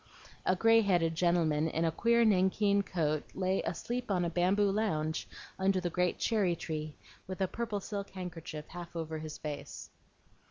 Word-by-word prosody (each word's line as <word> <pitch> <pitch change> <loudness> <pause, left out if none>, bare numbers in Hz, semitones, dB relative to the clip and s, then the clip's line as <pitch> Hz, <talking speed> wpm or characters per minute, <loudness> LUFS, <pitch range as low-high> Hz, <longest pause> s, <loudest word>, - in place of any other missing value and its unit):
A 185 - +4
gray 225 +4 +5
headed 175 -5 +2
gentleman 160 -2 +2
in 165 +1 0
a 165 - +2
queer 235 +7 +3
nankeen 200 0 +3
coat 155 -6 -1
lay 190 0 +1
asleep 240 +8 -3
on 180 -3 +1
a 170 - -2
bamboo 195 +4 +3
lounge 160 -7 -1 0.3
under 190 0 +2
the 175 -2 -2
great 180 +1 +1
cherry 200 -6 +1
tree, 155 -2 -5 0.3
with 185 0 -6
a 190 - +2
purple 220 0 -3
silk 200 0 -5
handkerchief 165 -5 -7
half 175 0 -9
over 160 -1 -3
his 155 -1 -6
face. 150 -2 -7
180 Hz, 165 wpm, -32 LUFS, 160-200 Hz, 0.3 s, gray